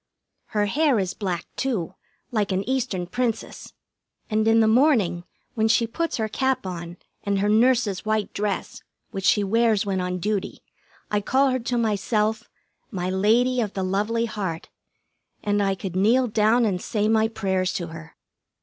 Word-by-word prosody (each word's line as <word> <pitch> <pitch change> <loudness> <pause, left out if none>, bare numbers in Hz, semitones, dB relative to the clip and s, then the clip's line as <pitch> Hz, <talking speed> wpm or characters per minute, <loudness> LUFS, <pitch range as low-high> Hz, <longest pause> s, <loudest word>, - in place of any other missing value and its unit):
Her 210 -2 0
hair 285 +4 +2
is 190 -2 -1
black, 180 -5 -3
too, 205 -10 -2 0.4
like 210 -4 0
an 190 +1 -1
Eastern 250 -9 -1
Princess 230 +3 -3 0.6
and 215 +1 +2
in 225 0 +5
the 220 - +4
morning 220 - +3 0.3
when 220 -1 +1
she 230 +1 +3
puts 330 +9 -2
her 220 -2 -1
cap 260 +2 -1
on 175 -1 -6 0.3
and 200 -1 0
her 200 +1 +1
nurse's 220 -2 +3
white 215 -1 -1
dress, 205 -1 -3 0.3
which 195 0 -4
she 205 - +4
wears 220 0 +2
when 190 -2 -1
on 180 0 -2
duty, 205 +2 -3 0.5
I 210 0 +1
call 265 +6 +2
her 255 - 0
to 240 +1 -2
myself, 215 0 0 0.4
"My 185 -5 -3
Lady 235 +6 +2
of 210 -3 -3
the 190 - -2
Lovely 210 +5 0
Heart," 190 -7 -4 0.7
and 205 0 +1
I 195 -1 +1
could 185 -1 -6
kneel 230 +7 +3
down 225 +1 +3
and 185 -4 -1
say 210 -1 -1
my 220 0 +3
prayers 190 -4 -1
to 175 -2 -4
her. 160 0 -11
210 Hz, 170 wpm, -24 LUFS, 190-230 Hz, 0.7 s, in